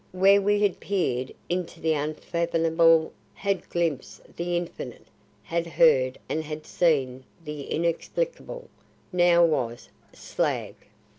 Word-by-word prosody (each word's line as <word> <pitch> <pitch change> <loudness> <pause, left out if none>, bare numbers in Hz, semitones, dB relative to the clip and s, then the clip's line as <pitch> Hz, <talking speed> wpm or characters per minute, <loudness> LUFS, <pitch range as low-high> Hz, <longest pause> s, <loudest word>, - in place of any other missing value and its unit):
Where 195 +2 +5
we 205 +1 +2
had 200 -3 +1
peered 130 -10 -1 0.2
into 175 -1 -3
the 160 -1 +1
unfathomable, 165 +1 +2 0.2
had 195 -3 -2
glimpsed 165 -6 -3
the 175 0 -1
infinite, 175 -1 -6 0.4
had 170 0 -2
heard 135 - +4
and 160 - -2
had 155 0 -7
seen 135 -7 +1 0.2
the 150 -2 -6
inexplicable, - - -2 0.5
now 175 -1 +5
was 120 -7 -2 0.2
Slag! - - -2
170 Hz, 115 wpm, -26 LUFS, 155-180 Hz, 0.5 s, Where